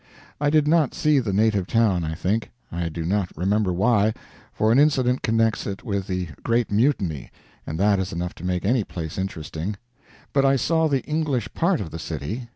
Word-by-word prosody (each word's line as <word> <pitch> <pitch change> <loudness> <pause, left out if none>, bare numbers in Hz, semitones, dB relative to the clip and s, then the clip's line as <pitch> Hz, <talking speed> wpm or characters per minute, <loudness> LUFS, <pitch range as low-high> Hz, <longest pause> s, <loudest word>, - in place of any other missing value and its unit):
I 145 0 +2
did 150 0 +3
not 155 -3 +3
see 150 -5 +3
the 115 -6 -2
native 100 -2 +2
town, 105 -7 +2
I 80 0 -3
think. 105 +8 -1 0.2
I 85 0 -2
do 80 0 -5
not 95 0 0
remember 95 +3 +1
why; 105 +3 +2 0.4
for 110 +1 +1
an 120 - +5
incident 130 -4 +3
connects 115 -1 +1
it 100 -1 -5
with 100 -3 -2
the 90 -2 -2
Great 115 -1 0
Mutiny, 100 - +1 0.4
and 80 +2 -4
that 100 0 +3
is 95 - -2
enough 85 +1 -3
to - - -11
make 90 0 -1
any 115 +2 +2
place 80 -3 -6
interesting. 90 +1 -4 0.6
But 140 - +3
I 135 0 +4
saw 160 +5 +2
the 140 -3 0
English 145 -8 -1
part 170 0 +1
of 85 -6 -5
the 80 - -6
city. 110 - -5
105 Hz, 195 wpm, -24 LUFS, 90-130 Hz, 0.6 s, an